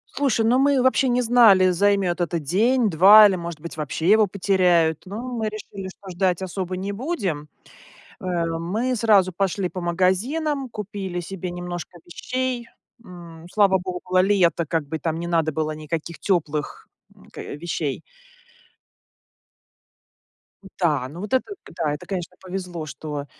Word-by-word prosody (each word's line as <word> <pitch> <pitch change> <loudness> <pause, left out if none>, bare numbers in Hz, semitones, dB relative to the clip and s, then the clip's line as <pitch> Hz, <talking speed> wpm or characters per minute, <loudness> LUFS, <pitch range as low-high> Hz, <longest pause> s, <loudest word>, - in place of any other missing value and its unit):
Слушай, 250 -6 +1
ну, 250 +3 +3
мы 280 0 +3
вообще 260 +1 +3
не 250 0 +1
знали, 220 -6 +6
займет 190 -1 +1
это 170 0 -1
день-два 210 - +6
или, 190 - 0
может 170 -3 -6
быть, 165 0 -9
вообще 155 +2 -3
его 215 -1 +5
потеряют, 180 -4 +2
но 210 +5 -6
мы 235 -4 -3
решили, 200 -2 -8
что 190 0 -13
ждать 180 0 0
особо 185 0 -4
не 195 +2 -3
будем. 200 - -3 0.8
Э, 180 -2 -1
мы 180 +10 -2
сразу 205 -5 +3
пошли 190 +1 -1
по 185 - -6
магазинам, 235 - 0
купили 200 -4 -5
себе 180 +1 -5
немножко 175 0 -7
вещей. 250 +5 -3 0.4
М, 170 -3 -12
слава 200 -3 +4
богу, 180 0 -2
лето, 185 -4 +3
как 160 -2 -1
бы, 160 +2 -5
там 160 +1 -2
не 170 - -4
надо 165 -2 +1
было 155 0 -2
никаких 155 0 -5
теплых, 155 -5 -2 0.3
м, - - -20
к - - -12
вещей. 155 -2 -4 2.8
Да. 150 -8 +1
Ну, 165 - -10
вот 210 +3 -6
это, 260 +10 0
к - - -14
да, 160 -4 -1
это, 150 - -7
конечно, 180 -3 -5
повезло, 180 -3 -6
что, 145 0 -6
185 Hz, 150 wpm, -23 LUFS, 170-210 Hz, 2.8 s, знали